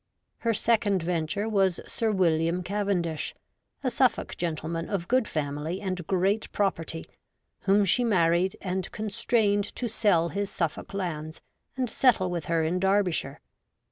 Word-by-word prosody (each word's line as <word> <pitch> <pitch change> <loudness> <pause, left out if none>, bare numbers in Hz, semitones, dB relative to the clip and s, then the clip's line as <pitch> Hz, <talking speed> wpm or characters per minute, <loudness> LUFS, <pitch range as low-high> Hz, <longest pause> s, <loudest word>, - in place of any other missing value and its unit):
Her 230 -1 +1
second 210 -5 +2
venture 175 +4 -1
was 195 -4 +2
Sir 225 -1 -1
William 170 -2 +2
Cavendish, 180 -6 -1 0.5
a - - +1
Suffolk - - +1
gentleman 165 0 -3
of 185 -4 -2
good 255 -2 +2
family 150 +4 -3
and 185 -4 -4
great 195 +3 +1
pro 200 -2 +2
perty, 165 -1 -6 0.6
whom 200 +1 +4
she 245 +7 +3
married 180 -4 +2
and 185 -1 -3
constrained 210 -1 0
to 245 - -2
sell 205 -7 +2
his 200 +2 -2
Suffolk 170 0 -3
lands 160 -5 -4 0.4
and 255 -1 0
settle 220 -6 +3
with 170 -2 -3
her 165 -1 +1
in 170 +3 0
Derbyshire. 190 -7 +1
185 Hz, 140 wpm, -27 LUFS, 165-205 Hz, 0.6 s, whom